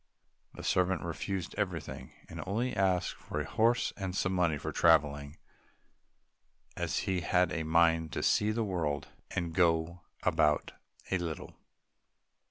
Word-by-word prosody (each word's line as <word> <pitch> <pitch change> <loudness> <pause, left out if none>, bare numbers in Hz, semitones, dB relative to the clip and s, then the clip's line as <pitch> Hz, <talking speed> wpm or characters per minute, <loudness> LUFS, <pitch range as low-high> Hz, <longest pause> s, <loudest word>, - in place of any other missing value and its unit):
The - - -8
servant 90 0 +1
refused 85 +2 -3
everything, 85 -9 -3 0.2
and - - -7
only 120 +6 -1
asked 95 -2 +1
for - - -5
a - - -2
horse 115 +2 +2
and 95 -2 -4
some 95 -1 0
money 85 -4 +2
for - - -4
traveling, 70 +1 +3 1.4
as - - -2
he 95 -2 0
had 90 0 +2
a 80 - -1
mind 80 0 +3
to - - -2
see 105 - +3
the 115 +1 0
world 85 -8 -2 0.2
and 85 -2 -3
go 85 -1 +2 0.2
about 75 -1 +2 0.4
a 95 - +2
little. 85 -3 -5
90 Hz, 140 wpm, -31 LUFS, 80-95 Hz, 1.4 s, traveling